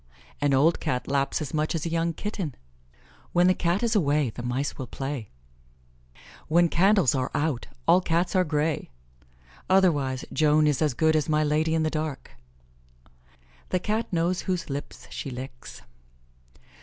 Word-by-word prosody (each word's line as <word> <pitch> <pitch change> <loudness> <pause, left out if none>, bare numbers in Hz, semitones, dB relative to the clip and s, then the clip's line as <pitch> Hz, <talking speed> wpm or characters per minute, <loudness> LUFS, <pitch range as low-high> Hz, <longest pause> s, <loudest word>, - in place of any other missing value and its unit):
"An 145 -1 +2
old 155 +5 +3
Cat 125 0 -2
laps 140 +2 0
as 140 - -7
much 155 +1 0
as 160 - -2
a - - -1
young 165 0 +1
kitten." 185 - -4 0.8
"When 175 0 +4
the 185 - +5
Cat 180 +4 0
is 235 -1 +1
away, 145 - +2
the 120 - -7
mice 125 +4 -2
will 130 - -6
play." 135 -4 -5 1.2
"When 170 +2 +4
candles 190 - +4
are 130 -1 -1
out, 145 -5 -1 0.2
all 175 +3 +6
Cats 170 +2 0
are 185 - +4
grey." 150 -1 -1 0.8
Otherwise, 145 -9 +2
"Joan 155 0 +4
is 150 -2 +1
as 150 -5 +1
good 160 +2 +3
as 155 0 0
my 155 0 +3
Lady 155 +2 +1
in 160 - +1
the 155 - 0
dark." 155 -3 -4 1.4
"The 185 - +1
Cat 215 +4 -2
knows 175 +1 0
whose 180 -5 -3
lips 140 +1 -6
she - - -5
licks." 125 0 -9
155 Hz, 160 wpm, -26 LUFS, 140-175 Hz, 1.4 s, all